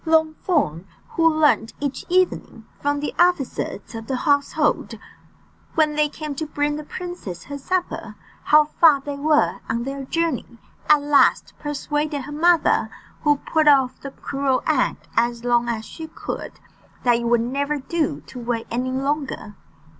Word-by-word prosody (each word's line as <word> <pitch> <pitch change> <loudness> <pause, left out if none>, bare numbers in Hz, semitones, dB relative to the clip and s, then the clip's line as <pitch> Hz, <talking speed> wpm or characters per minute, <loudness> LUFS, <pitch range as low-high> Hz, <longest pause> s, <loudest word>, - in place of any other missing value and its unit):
Longthorn, 315 - +1 0.2
who 330 0 +3
learned 300 -8 +2
each 280 -2 -3
evening 355 -10 0
from 285 0 0
the 295 - -3
officers 320 - 0
of 225 -1 -7
the 265 - -1
household, 285 +1 +1 0.8
when 310 -2 +3
they 300 0 +2
came 305 -1 -6
to 315 - -3
bring 290 0 -1
the 305 - -5
princess 300 - -7
her 285 +1 -7
supper, 360 +5 -3 0.3
how 305 0 +6
far 300 -1 +4
they 285 +1 -5
were 300 +1 +2
on 235 +1 -1
their 275 +1 -5
journey, 315 -6 -2 0.3
at 300 -1 +6
last 290 -1 +3
persuaded 295 0 -2
her 290 - -8
mother, 335 +3 +3 0.3
who 295 -1 +4
put 315 -1 +2
off 265 -3 +4
the 275 - -6
cruel 270 -1 -1
act - - 0
as 235 0 +1
long 240 0 +2
as 220 -2 -3
she 320 -1 -8
could, 315 - -6 0.5
that 240 -1 +4
it 235 - -4
would 235 0 +3
never 280 +5 -1
do 300 +3 -2
to 255 - -10
wait 235 -1 -2
any 250 +2 -1
longer. 270 -4 -2
285 Hz, 155 wpm, -22 LUFS, 250-310 Hz, 0.8 s, how